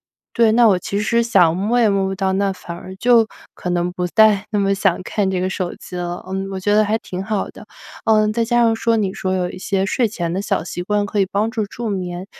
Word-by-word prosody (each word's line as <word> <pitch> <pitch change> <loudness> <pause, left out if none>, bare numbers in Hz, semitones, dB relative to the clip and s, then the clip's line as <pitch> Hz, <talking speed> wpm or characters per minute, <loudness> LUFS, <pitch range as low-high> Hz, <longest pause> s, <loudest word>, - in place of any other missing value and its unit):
离， - - -78
对， 230 -2 +4
那 235 0 +6
我 190 -4 +3
其 200 +3 -3
实 235 +3 +2
想 180 -8 +4
摸 210 +6 +1
也 230 - +4
摸 195 -1 +1
不 195 - -3
到， 190 0 0
那 195 0 +1
反 170 -2 -8
而 185 +2 -10
就 235 +1 +4 0.3
可 180 - -5
能 175 0 0
不 180 0 -3
再 210 +1 +4
那 210 - +1
么 195 0 +2
想 195 -3 +1
看 200 0 -1
这 190 -1 -1
个 185 - 0
手 185 -2 -3
机 - - -11
了， 175 0 -4
嗯， 195 +1 -4
我 190 - -4
觉 205 +2 +1
得 215 - +5
还 215 +2 +1
挺 185 -2 -6
好 210 -1 -2
的。 - - -12 0.4
呃， 215 -1 +4
再 230 +1 +1
加 240 +1 +2
上 230 -1 +3
说 230 0 +1
你 195 -3 -1
说 185 0 -2
有 180 -1 0
一 - - -9
些 195 0 -1
睡 235 +4 +1
前 175 -6 -3
的 190 - -1
小 195 -4 -1
习 175 +1 -5
惯 205 +2 0
可 205 +1 -2
以 195 - +4
帮 215 +3 0
助 225 -2 -1
助 230 +3 -6
眠， 180 -2 -4
195 Hz, 285 characters per minute, -19 LUFS, 185-220 Hz, 0.4 s, 那